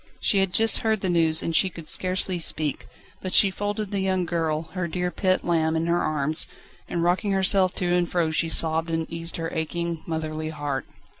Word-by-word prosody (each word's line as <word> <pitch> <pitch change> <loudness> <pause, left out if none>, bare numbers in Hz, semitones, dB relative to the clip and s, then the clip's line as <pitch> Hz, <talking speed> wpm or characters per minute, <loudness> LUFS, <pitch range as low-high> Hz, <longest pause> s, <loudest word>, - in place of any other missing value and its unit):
She 200 - +2
had 195 -1 +1
just 225 +4 +3
heard 220 -2 0
the 185 - 0
news, 160 -2 +2
and 165 - -2
she 190 - +4
could 165 -3 -11
scarcely 185 0 -1
speak, 155 -3 -2 0.3
but 185 -1 -1
she 195 - +6
folded 205 +1 -3
the 200 - -1
young 190 -1 0
girl, 160 -2 -1
her 180 -2 -2
dear 180 +1 -2
pet 185 0 0
lamb, 160 -2 +1
in 160 +1 0
her 170 +1 +1
arms, 155 +1 +1 0.4
and 170 -1 -1
rocking 185 +4 +1
herself 190 -1 +2
to 175 -1 0
and 175 -1 +1
fro 170 -3 0
she 165 +1 0
sobbed 160 0 +3
and 165 0 -1
eased 165 0 0
her 165 -1 -4
aching, 170 0 -3
motherly 155 -1 -3
heart. 145 -4 -4
170 Hz, 205 wpm, -25 LUFS, 160-185 Hz, 0.4 s, she